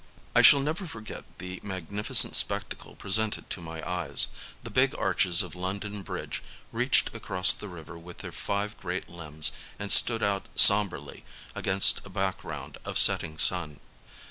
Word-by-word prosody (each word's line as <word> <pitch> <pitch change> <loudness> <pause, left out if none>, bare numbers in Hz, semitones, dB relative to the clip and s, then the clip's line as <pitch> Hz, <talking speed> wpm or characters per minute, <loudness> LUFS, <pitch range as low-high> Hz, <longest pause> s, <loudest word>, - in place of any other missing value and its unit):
I - - +3
shall 140 - +6
never 160 +6 -5
forget 110 -7 -11
the 90 0 -10
magnificent 100 +1 +1
spectacle - - -1
presented 110 +2 -1
to 90 - -6
my 80 -1 -10
eyes: 90 -1 -2 0.3
the - - -10
big - - 0
arches 90 -1 +1
of 90 - -11
London 100 +3 -7
Bridge - - -8 0.3
reached - - -1
across 90 0 +3
the 105 - -9
river 85 -2 -13
with 85 +1 -14
their - - -10
five 105 +1 -5
great 90 0 -7
limbs 80 -2 +1 0.3
and 100 -1 -4
stood 115 -2 +6
out 100 -1 -3
sombrely 100 -9 +3 0.3
against 95 +1 +3
a - - -13
background 80 -7 -7
of - - -5
setting 80 -1 +3
sun. 80 -4 +3
95 Hz, 150 wpm, -25 LUFS, 85-100 Hz, 0.3 s, shall